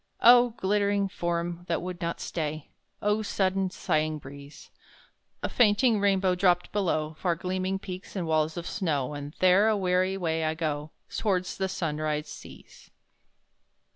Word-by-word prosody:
Oh, 245 -1 +7
glittering 200 0 +1
Form 175 -1 -3
that 165 - 0
would 180 -1 -6
not 170 0 -2
stay! 155 -2 -4 0.3
Oh, 210 +1 +2
sudden, 195 -2 0
sighing 155 -3 -1
breeze! 140 0 -12 0.7
A - - +1
fainting 220 0 +3
rainbow 195 -2 +2
dropped 180 -1 +2
below 160 -6 0
Far 175 -3 +1
gleaming 185 +2 -2
peaks 185 0 -8
and 185 -3 -2
walls 160 0 +1
of 170 - -4
snow 150 -10 -1
And 145 +1 -7
there, 185 +3 +5
a 220 -1 +3
weary 185 0 +1
way, 165 -3 -1
I 155 0 0
go, 155 -2 -3 0.3
Towards 185 -4 0
the 190 0 -1
Sunrise 155 -3 -2
seas. - - -13
180 Hz, 145 wpm, -27 LUFS, 155-195 Hz, 0.7 s, Oh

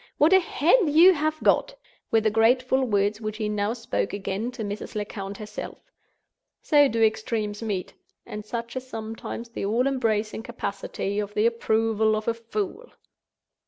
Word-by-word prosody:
"What 310 +5 +5
a 380 - +8
head 350 - +3
you 335 +6 +7
have 310 0 -1
got!" - - +2 0.3
were 225 - +3
the 215 0 +1
grateful 250 +4 +3
words 205 -1 +1
which 215 -1 -4
he 215 -1 -2
now 210 +1 -1
spoke 230 -3 -3
again 200 +3 -3
to 240 -3 -5
Mrs. 205 +2 -6
Lecount 200 -1 -5
herself. 210 -1 -7 0.9
So 290 -2 +5
do 225 -2 +1
extremes 215 -1 0
meet; 205 -5 -3 0.3
and 210 0 -7
such 235 +3 -5
is 260 0 -5
sometimes 225 0 -6
the 230 - -5
all 230 +5 +1
embracing 225 -6 0
capacity 200 -3 -4
of 210 0 -4
the 210 - +2
approval 220 -1 +2
of 215 0 -4
a 230 - +2
fool! 390 - -5
225 Hz, 160 wpm, -25 LUFS, 210-255 Hz, 0.9 s, a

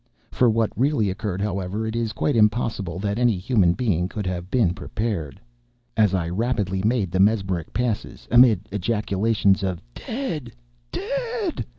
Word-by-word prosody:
For 125 - +3
what 110 0 +1
really 120 -4 +1
occurred, 100 -1 -3
however, 100 +1 -2
it 110 +1 -3
is 115 -2 -1
quite 140 +4 0
impossible 105 -5 +1
that 100 +3 -2
any 120 -5 +3
human 95 -3 +3
being 90 -6 0
could 105 -1 -4
have 90 -1 -3
been 110 -9 +2
prepared. 95 - -4 0.6
As 105 -3 +3
I 85 -3 -1
rapidly 95 -1 -1
made 105 -4 +1
the 95 - 0
mesmeric 95 -5 +1
passes, 120 -3 -3
amid 115 -5 +5
ejaculations 105 0 +1
of 95 -3 -2
"dead! 165 - -5 0.4
dead!" 465 -3 -3
105 Hz, 150 wpm, -23 LUFS, 95-120 Hz, 0.6 s, amid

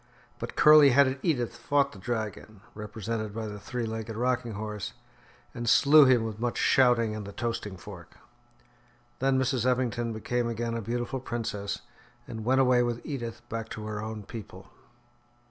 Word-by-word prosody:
But - - -6
curly 150 -2 +8
headed 135 0 +4
Edith 125 -9 0
fought 140 -1 +1
the 100 - -12
dragon, 110 -1 -5
represented 110 0 -5
by 115 -1 -3
the 105 -1 -6
three 120 +4 -4
legged 110 0 -5
rocking 125 0 -1
horse, 105 0 -5 0.6
and 120 -1 -2
slew 145 +3 +7
him 125 -3 +4
with 110 -1 -5
much 120 0 -2
shouting 120 -4 +3
and 110 - -5
the 100 - -8
toasting 105 -2 -4
fork. 90 -2 -11 1.0
Then 135 0 +2
Mrs. 130 -2 +1
Eppington 120 -2 0
became 120 +2 -2
again 115 0 -3
a 115 - -2
beautiful 120 +4 -3
princess, 110 -5 -4 0.5
and 110 -2 -6
went 130 +3 +3
away 125 -1 +4
with 120 -1 -2
Edith 120 -4 -6
back 115 -1 -5
to 110 - -7
her 105 -1 -4
own 110 -1 -6
people. 110 0 -10
115 Hz, 165 wpm, -28 LUFS, 110-125 Hz, 1.0 s, curly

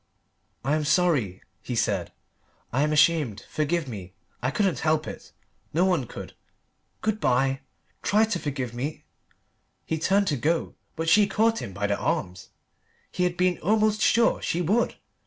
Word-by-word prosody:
"I 140 - +2
am 155 - 0
sorry," 150 - +1 0.2
he 125 - -4
said. 100 -6 0 0.6
"I 130 - +2
am 150 +1 +2
ashamed. 150 -9 +2
Forgive 155 +1 -1
me. 95 -6 -8 0.3
I 125 - 0
couldn't 185 - 0
help 155 -1 +1
it. - - -9 0.4
No 175 +3 +4
one 175 -10 +1
could. - - -9 0.7
Good 215 0 0
bye. 135 -1 +2 0.4
Try 215 +2 +3
to 210 -5 -2
forgive 130 -6 -3
me 140 +6 -4 0.4
" - - -46
He 160 - -2
turned 195 +5 +3
to 145 - 0
go, 160 +7 0 0.2
but 165 +1 -3
she 205 +5 +6
caught 225 +2 +2
him 100 - -6
by 100 +2 -3
the 100 0 0
arms. 90 +1 -2 0.6
He 180 - 0
had 175 0 -1
been 180 -1 +2
almost 215 +2 +2
sure 235 0 +3
she 170 - -1
would. 215 +8 +1
155 Hz, 165 wpm, -26 LUFS, 125-185 Hz, 0.7 s, she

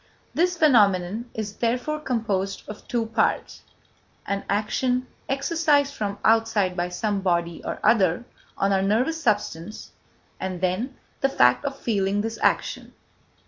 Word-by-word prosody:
This 355 +2 +1
phenomenon 215 - +3
is 210 -2 -5
therefore 250 +6 -1
composed 210 -8 -2
of 210 - -9
two 235 -2 0
parts: 225 0 0 0.6
an 200 0 -2
action 250 +5 0 0.2
exercised 285 0 +2
from 205 -4 -3
outside 220 -4 +3
by 175 0 -1
some 200 +3 -1
body 170 -3 -1
or - - -4
other 200 -1 +3 0.3
on 195 0 +2
our 190 - +2
nervous 250 +12 +1
substance; 205 - -2 0.5
and, 185 -2 -4
then, 190 +9 -1 0.2
the 270 - +2
fact 125 - +4
of 275 -1 -3
feeling 205 -4 0
this 225 +1 -4
action. - - 0
215 Hz, 135 wpm, -24 LUFS, 195-255 Hz, 0.6 s, fact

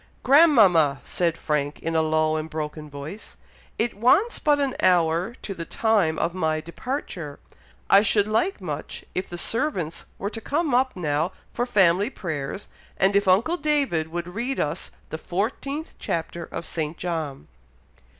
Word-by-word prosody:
"Grandmama!" 210 - +6
said 170 -2 -1
Frank, 150 -1 -1
in 165 0 -3
a 160 - +4
low 155 0 +2
and 155 0 -3
broken 150 -1 -5
voice, 145 +9 -9 0.4
"it 235 +1 0
wants 320 - +3
but 295 -1 +3
an 275 -2 0
hour 175 +4 +3
to 200 - -4
the 170 - -6
time 200 -5 +1
of 170 +1 0
my 160 -4 0
departure; 170 - -5 0.5
I 195 - +7
should 205 -1 +3
like 225 - +1
much - - -6
if 185 - -3
the 175 - -6
servants 190 - -1
were 200 - -3
to 225 - -6
come 295 +3 0
up 255 +1 +2
now 160 0 -1 0.2
for 245 - -1
family 195 -2 +4
prayers 160 - -5 0.3
and 195 +1 +3
if 200 0 +3
uncle 225 - +3
David 280 - +1
would 175 +2 -5
read 245 +6 -2
us 150 - -2 0.2
the 160 - -4
14th 270 - -3
chapter 170 +1 -3
of 165 - -6
St. 155 -1 -3
John." 160 - -4
180 Hz, 160 wpm, -24 LUFS, 160-235 Hz, 0.5 s, I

